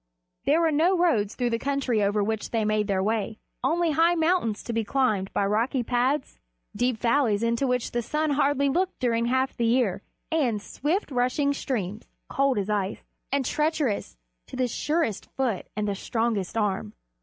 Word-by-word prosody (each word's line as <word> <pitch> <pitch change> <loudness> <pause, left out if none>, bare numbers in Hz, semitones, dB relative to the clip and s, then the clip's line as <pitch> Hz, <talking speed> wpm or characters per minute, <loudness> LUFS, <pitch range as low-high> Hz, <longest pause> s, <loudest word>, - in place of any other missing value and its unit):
There 310 +4 +4
were 325 -1 +3
no 335 +5 +3
roads 230 - +2
through 245 -2 0
the 230 - 0
country 270 -5 0
over 205 +1 +2
which 220 +1 -2
they 225 -2 0
made 215 -1 +1
their 190 -2 +1
way, 215 0 -1 0.3
only 340 0 +2
high 330 +3 +4
mountains 325 - +1
to 235 - -4
be 225 0 0
climbed 215 -5 0
by 200 - +1
rocky 235 +6 +1
paths, 255 +4 0 0.4
deep 245 -1 +1
valleys 230 -3 +2
into 235 +3 +1
which 250 -1 0
the 240 - 0
sun 305 +5 -1
hardly 280 0 +2
looked 360 +7 0
during 235 -2 +1
half 260 +2 +1
the 235 - 0
year, 225 -5 +2 0.3
and 260 -10 +1
swift 300 - -2
rushing 255 +3 +1
streams, 215 -7 -3 0.2
cold 275 -3 +1
as 200 -1 -1
ice, 205 -2 -2 0.3
and 275 -1 +1
treacherous 300 - -1 0.3
to - - -9
the 255 -1 +1
surest 295 - -1
foot 250 -8 -1
and 210 0 -1
the 200 - 0
strongest 225 -1 -2
arm. 195 - -1
245 Hz, 180 wpm, -26 LUFS, 215-280 Hz, 0.4 s, There